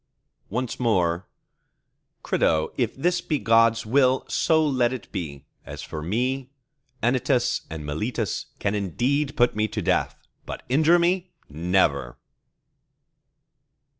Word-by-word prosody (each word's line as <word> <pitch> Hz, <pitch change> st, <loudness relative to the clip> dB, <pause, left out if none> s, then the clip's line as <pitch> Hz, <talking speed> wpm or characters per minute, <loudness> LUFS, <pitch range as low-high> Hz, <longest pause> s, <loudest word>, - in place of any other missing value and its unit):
Once 125 Hz, +3 st, -3 dB
more:— 90 Hz, -6 st, +1 dB, 1.0 s
Crito, 80 Hz, -1 st, +1 dB
if 120 Hz, -3 st, -1 dB
this 175 Hz, +5 st, +1 dB
be 155 Hz, -, -1 dB
God's 115 Hz, -2 st, +3 dB
will, 130 Hz, +2 st, +3 dB
so 160 Hz, -1 st, +2 dB
let 125 Hz, -4 st, +2 dB
it 130 Hz, -5 st, -7 dB
be. 75 Hz, -8 st, -5 dB, 0.2 s
As -, -, -8 dB
for 80 Hz, -1 st, -6 dB
me, 125 Hz, -, -1 dB, 0.5 s
Anytus 125 Hz, +1 st, +1 dB
and 80 Hz, -2 st, -6 dB
Meletus 105 Hz, +9 st, -2 dB
can 100 Hz, -, -1 dB
indeed 125 Hz, -, -1 dB
put 120 Hz, -1 st, +3 dB
me 110 Hz, 0 st, +1 dB
to -, -, -4 dB
death, -, -, 0 dB, 0.3 s
but -, -, -6 dB
injure 155 Hz, +6 st, +5 dB
me, 180 Hz, +1 st, +1 dB, 0.2 s
never! 75 Hz, -5 st, +1 dB
115 Hz, 120 wpm, -24 LUFS, 90-135 Hz, 1.0 s, injure